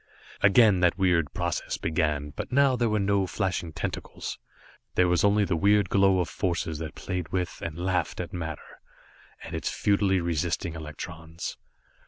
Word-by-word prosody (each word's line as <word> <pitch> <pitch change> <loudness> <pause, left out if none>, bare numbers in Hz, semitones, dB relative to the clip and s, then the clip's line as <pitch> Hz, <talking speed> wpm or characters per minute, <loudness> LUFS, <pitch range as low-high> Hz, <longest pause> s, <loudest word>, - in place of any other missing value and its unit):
Again 100 -1 +6
that 90 0 +3
weird 90 -5 +2
process 85 -2 -2
began, 75 -2 -1
but - - -6
now 135 0 +4
there 120 -2 +1
were 105 - +1
no 100 -1 +1
flashing 90 -2 -2
tentacles. - - -5 0.6
There 90 - +4
was 90 0 +2
only 100 0 +4
the 95 - 0
weird 100 +2 +3
glow 95 -1 +4
of 90 - 0
forces 85 -4 -2
that 80 -1 -6
played 90 -3 -4
with, 90 -1 -3
and 80 -1 -4
laughed 90 -1 -1
at - - -5
matter, 80 -4 -6 0.6
and - - -8
its - - -2
futilely 100 -2 +2
resisting 85 +1 -1
electrons. 80 +1 -7
90 Hz, 160 wpm, -27 LUFS, 80-100 Hz, 0.6 s, Again